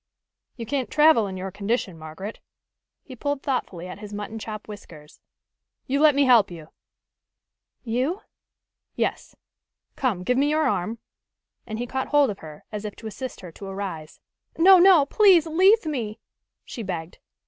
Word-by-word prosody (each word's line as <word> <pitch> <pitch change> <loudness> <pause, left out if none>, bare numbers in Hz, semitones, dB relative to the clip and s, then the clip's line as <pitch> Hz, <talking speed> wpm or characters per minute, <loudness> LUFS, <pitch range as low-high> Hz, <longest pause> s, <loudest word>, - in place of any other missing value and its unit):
"You 230 - -6
can't 260 +2 -2
travel 300 -8 +4
in 190 -1 -6
your 190 +1 -5
condition, 200 -1 -2
Margaret." 160 +7 -8 0.6
He 260 - -11
pulled 285 +2 -3
thoughtfully 195 -10 -3
at 185 - -9
his 210 -1 -9
mutton 210 +2 -6
chop 215 -1 -7
whiskers. 165 -8 -12 0.7
"You 275 +2 0
let 305 -2 +6
me 285 - +4
help 240 -6 +5
you." 165 -3 -11 1.1
"You?" 260 - -2 0.7
"Yes. - - -3 0.6
Come, 220 -9 -1
give 250 +6 +1
me 285 +1 +2
your 310 0 +2
arm," 220 0 -1 0.7
and 220 -1 -5
he 240 - -3
caught 265 +2 -3
hold 290 -5 +3
of 200 - -9
her, 155 -1 -11
as 210 -1 -5
if 210 -1 -6
to 225 - -13
assist 240 +4 -7
her 180 - -10
to 195 +4 -10
arise. 190 -5 -6 0.4
"No, 370 +3 +8
no! 350 -5 +7
Please 365 0 +5
leave 375 +6 +4
me!" 235 -9 -4 0.5
she 240 - -7
begged. 175 -5 -6
225 Hz, 160 wpm, -24 LUFS, 195-285 Hz, 1.1 s, No